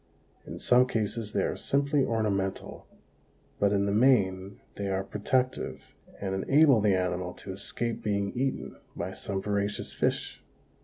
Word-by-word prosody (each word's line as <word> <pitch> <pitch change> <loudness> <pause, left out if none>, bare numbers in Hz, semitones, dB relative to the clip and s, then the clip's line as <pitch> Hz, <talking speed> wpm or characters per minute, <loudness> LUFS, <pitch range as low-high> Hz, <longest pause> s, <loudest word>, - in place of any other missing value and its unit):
In - - -6
some 125 +1 +4
cases 110 -1 -2
they - - +1
are - - -1
simply 140 0 +1
ornamental, 105 -5 -2 0.7
but 100 -1 +3
in 100 -1 +2
the 100 - 0
main 100 -5 +2
they 100 - -4
are 95 0 0
protective 125 +6 -2 0.3
and 95 -1 -3
enable 135 +5 +4
the 100 -2 +3
animal 90 -1 -1
to 95 - -8
escape 115 +4 -3
being 100 -1 -1
eaten 135 +2 -2 0.2
by - - -4
some 95 -1 -4
voracious 100 0 -2
fish. - - -1
105 Hz, 145 wpm, -28 LUFS, 95-125 Hz, 0.7 s, some